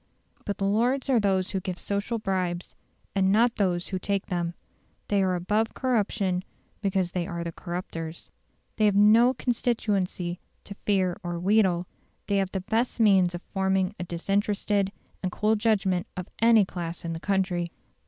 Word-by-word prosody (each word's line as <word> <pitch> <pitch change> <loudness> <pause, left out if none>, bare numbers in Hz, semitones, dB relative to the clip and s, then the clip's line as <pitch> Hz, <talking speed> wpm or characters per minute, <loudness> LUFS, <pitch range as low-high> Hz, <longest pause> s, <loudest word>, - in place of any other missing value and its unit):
But 205 - -2
the 195 - -1
Lords 245 +7 +1
are 245 - +5
those 190 -3 +1
who 195 - -1
give 185 -1 -4
social 200 +5 -2
bribes, 185 -4 -2 0.4
and 190 -1 +3
not 230 +3 +3
those 180 -3 0
who 185 - -2
take 200 0 -1
them. 175 -1 -2 0.5
They 200 -1 +3
are 185 -1 +2
above 210 +6 0
corruption 205 -7 0 0.4
because 190 -3 0
they 175 -1 -2
are 170 0 -4
the 170 - -4
corruptors. 170 -2 -6 0.5
They 215 - +3
have 205 -2 +3
no 225 +5 +6
constituency 205 -8 -1 0.2
to 200 - -8
fear 190 -3 +2
or 175 -1 -4
wheedle; 185 -2 +3 0.4
they 200 - +1
have 195 -1 0
the 190 - -2
best 225 +6 -1
means 190 -5 +4
of 175 - -7
forming 190 0 +1
a - - -2
disinterested 200 +3 0 0.3
and 185 - -2
cool 215 +3 +2
judgment 195 -5 +1
of 180 - -4
any 230 -3 +6
class 170 -2 -6
in 165 - -2
the 165 - -5
country. 185 -3 0
195 Hz, 165 wpm, -27 LUFS, 180-210 Hz, 0.5 s, no